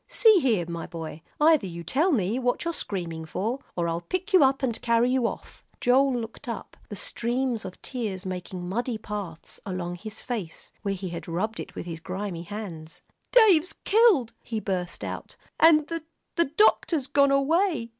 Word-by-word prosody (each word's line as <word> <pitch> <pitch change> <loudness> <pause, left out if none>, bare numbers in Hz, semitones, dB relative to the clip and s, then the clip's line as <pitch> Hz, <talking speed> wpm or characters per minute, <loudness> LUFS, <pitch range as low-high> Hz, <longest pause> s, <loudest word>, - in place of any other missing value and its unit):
"See 445 -5 +6
here, 225 - +2
my 170 -1 -5
boy, 160 -1 -7 0.2
either 305 -8 +5
you 170 -1 -7
tell 300 - +2
me 220 - +1
what 245 +5 0
you're 335 - 0
screaming 170 - -3
for, 215 - -2 0.2
or 170 -1 0
I'll 165 0 -1
pick 370 - -4
you 370 - +8
up 270 0 +2
and 235 -4 -1
carry 235 +1 +3
you 255 -2 +2
off." - - -8 0.2
Joel 260 +2 +4
looked 230 +3 -7
up, 225 -4 -6
the 205 - -5
streams 240 +3 -2
of 185 - -8
tears 210 -7 -4
making 180 -1 -5
muddy 235 +4 -1
paths 205 -6 -7
along 175 -3 -4
his 215 +3 -8
face, 215 -10 -5
where 200 -2 -1
he 185 -1 -5
had 170 0 -6
rubbed 195 +7 -2
it - - -7
with - - -5
his 165 -2 -6
grimy 185 0 -4
hands. 170 -4 -7 0.3
"Dave's 390 -7 +6
killed," 395 - +4
he 225 -2 -3
burst 185 -4 -3
out, - - -6 0.2
"and 310 -2 +7
the 330 0 -4 0.3
the 335 - +3
doctor's 315 -2 +3
gone 280 0 +4
away!" 280 -1 +2
225 Hz, 180 wpm, -26 LUFS, 180-275 Hz, 0.3 s, you